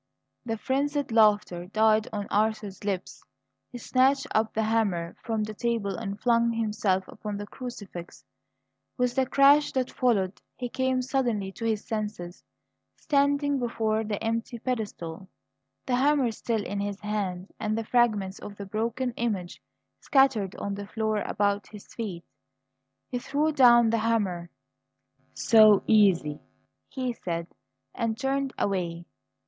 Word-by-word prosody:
The 225 0 -1
frenzied 280 +3 -1
laughter 210 -5 +3
died 215 +1 +3
on 205 -2 -3
Arthur's 215 -2 0
lips. 195 -3 -4 0.5
He 245 - -7
snatched 260 +3 +2
up 220 0 +2
the 220 - 0
hammer 205 -7 0
from 220 -2 -1
the 215 0 -5
table 225 -3 -1
and 200 -2 -5
flung 235 -1 +2
himself 210 -4 0
upon 210 -1 -6
the 205 - -5
crucifix. 205 -8 -9 0.7
With 250 -1 +1
the 260 0 +1
crash 285 +3 +5
that 260 -2 -1
followed 205 -7 0
he 245 -1 -4
came 260 0 0
suddenly 240 -7 -1
to 230 - -6
his 220 -2 -1
senses, 210 -5 -5 0.5
standing 285 0 +1
before 225 -2 0
the 210 -1 -3
empty 230 +2 -2
pedestal, 205 -8 -4 0.6
the 250 -1 +1
hammer 275 -2 +3
still 220 -1 -2
in 200 - -3
his 200 0 -3
hand, 200 -3 -3
and 215 0 -1
the 225 - -3
fragments 215 -6 +1
of 205 - -9
the 200 - -7
broken 230 +5 -2
image 200 -7 -3 0.4
scattered 265 -9 +2
on 200 - -4
the 200 0 -6
floor 215 -1 -1
about 200 -1 0
his 210 -2 -13
feet. 190 -7 -5 0.8
He 245 - -2
threw 295 +5 0
down 240 -5 +6
the 230 - +2
hammer. 200 -7 0 0.9
"So 215 -3 +6
easy!" 185 -9 +3 0.5
he 255 -2 -3
said, 170 -6 -4 0.5
and 225 -1 -2
turned 270 +1 -1
away. 175 -3 -2
220 Hz, 140 wpm, -27 LUFS, 200-245 Hz, 0.9 s, down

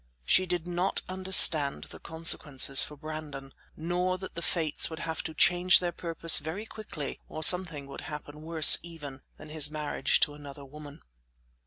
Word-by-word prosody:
She 185 - +2
did 175 -1 -4
not 180 +2 -3
understand 185 -6 +3
the - - -13
consequences 150 -4 +1
for 150 - -5
Brandon, 150 -3 -10 0.2
nor 180 +3 -3
that 190 0 -10
the 170 - -8
Fates 160 -3 0
would 160 - -9
have 160 -1 -6
to 160 - -9
change 180 +3 +3
their 175 -1 -4
purpose 165 -1 +4
very 170 +8 -8
quickly 190 -11 -9
or 155 - -6
something 165 -5 +3
would 140 - -11
happen 150 0 -10
worse, 160 0 +5
even, 150 -5 -12 0.2
than - - -14
his 150 -1 +1
marriage 150 -1 -2
to 145 - +1
another 145 -1 -13
woman. 145 +1 -14
160 Hz, 165 wpm, -27 LUFS, 145-175 Hz, 0.2 s, worse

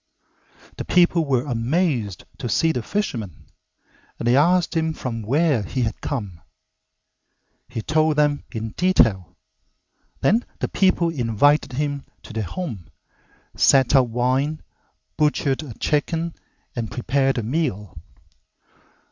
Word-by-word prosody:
The - - -3
people 175 -2 +3
were 130 -3 +1
amazed 125 - -1
to 125 -4 -4
see 165 +6 +2
the 125 - -2
fisherman, 115 - -4 0.7
and 120 - -3
they 120 - +4
asked 175 +4 +3
him 160 -1 +1
from 115 -6 -5
where 140 +3 +2
he 120 +6 -2
had 110 - -3
come. 100 - -4 1.3
He 120 -3 -5
told 155 +2 +2
them 150 -1 +2
in 110 -2 -4
detail, 100 - +2 0.8
then 225 +5 +3 0.2
the - - -2
people 185 -3 +2
invited 130 +1 +2
him 145 +1 -2 0.2
to - - -11
their 110 - -2
home, 105 - -5 0.7
set 135 0 +4
out 130 -3 +4
wine, 130 +6 0 0.5
butchered 150 -2 +1
a 135 -8 -9
chicken, 165 +2 -1 0.4
and 115 -3 -3
prepared 135 +2 0
a 120 - -1
meal. 115 - -2
135 Hz, 125 wpm, -22 LUFS, 115-160 Hz, 1.3 s, they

